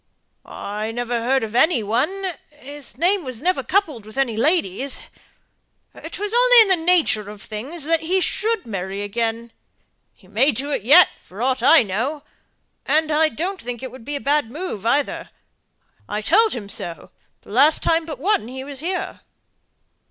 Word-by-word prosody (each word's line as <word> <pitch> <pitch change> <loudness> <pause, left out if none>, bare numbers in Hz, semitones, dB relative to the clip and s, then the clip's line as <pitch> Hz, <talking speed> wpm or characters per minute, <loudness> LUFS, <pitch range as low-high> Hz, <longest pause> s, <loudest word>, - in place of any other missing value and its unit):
"I 210 +2 -5
never 240 0 -2
heard 260 +2 +1
of 220 -1 -5
any 310 -1 +3
one 330 - -1 0.2
his 290 -1 -10
name 365 +2 +2
was 255 -4 -6
never 365 +6 0
coupled 315 - 0
with 215 +3 -13
any 260 -5 0
lady's 270 - 0 0.9
'twas 415 +2 -5
only - - +7
in 440 - +5
the 375 - +5
nature 300 - +3
of 210 0 -10
things 260 +12 -6
that 325 +2 +2
he 355 +4 0
should 440 +2 0
marry 195 -2 -4
again; 230 +2 -3 0.6
he 185 - -22
may 240 +9 +2
do 280 +6 -3
it - - -1
yet, 295 - +7
for 200 +6 -8
aught 260 -1 0
I 290 +3 +6
know, 250 +10 -3 0.6
and 310 0 +1
I 310 +1 +3
don't 360 - -4
think 240 0 -6
it 260 - -6
would 255 -2 -12
be 290 +5 -5
a - - -2
bad 285 -3 0
move 250 - -5
either. 280 +4 0 0.8
I 210 +1 -3
told 435 - +4
him 220 -5 -6
so, 170 -4 -5 0.3
the - - -15
last 280 +8 +4
time 330 -1 +1
but 305 -4 -6
one 330 - 0
he 260 +2 -7
was 275 -1 -8
here." 360 +5 -4
270 Hz, 175 wpm, -21 LUFS, 225-330 Hz, 0.9 s, only